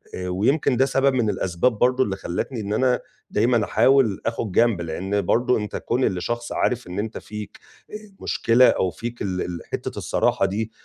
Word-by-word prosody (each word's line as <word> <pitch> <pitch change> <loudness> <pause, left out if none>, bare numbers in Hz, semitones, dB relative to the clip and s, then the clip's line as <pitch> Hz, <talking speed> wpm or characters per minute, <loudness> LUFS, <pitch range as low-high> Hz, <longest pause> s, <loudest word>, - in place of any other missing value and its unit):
آآ 90 0 -4
ويمكن 120 - +1
ده 135 - +4
سبب 135 0 +2
من 115 -4 +1
الأسباب 105 +4 0
برضه 125 +1 +3
اللي 100 -5 -2
خلّتني 105 +6 -4
إن 105 0 -3
أنا 125 +2 +2 0.3
دايمًا 115 +1 +2
أحاول 120 -3 +3
آخُد 115 -2 -2
جنب، 115 -2 +3
لإن 95 +5 -2
برضه 120 +4 +2
أنت 105 -1 -5
كون 125 +2 -1
اللي 90 -4 0
شخص 120 +5 -3
عارف 125 -3 -1
إن 90 +3 -5
أنت 110 +1 -4
فيك، 105 -1 -8 0.3
آآ - - -7 0.3
مشكلة 120 +2 +4
أو 95 - +1
فيك 120 +6 -7
ال 90 -2 -2
ال 85 -1 -4
حتّة - - -4
الصراحة - - +1
دي 105 +3 -2
110 Hz, 190 wpm, -23 LUFS, 95-125 Hz, 0.3 s, ده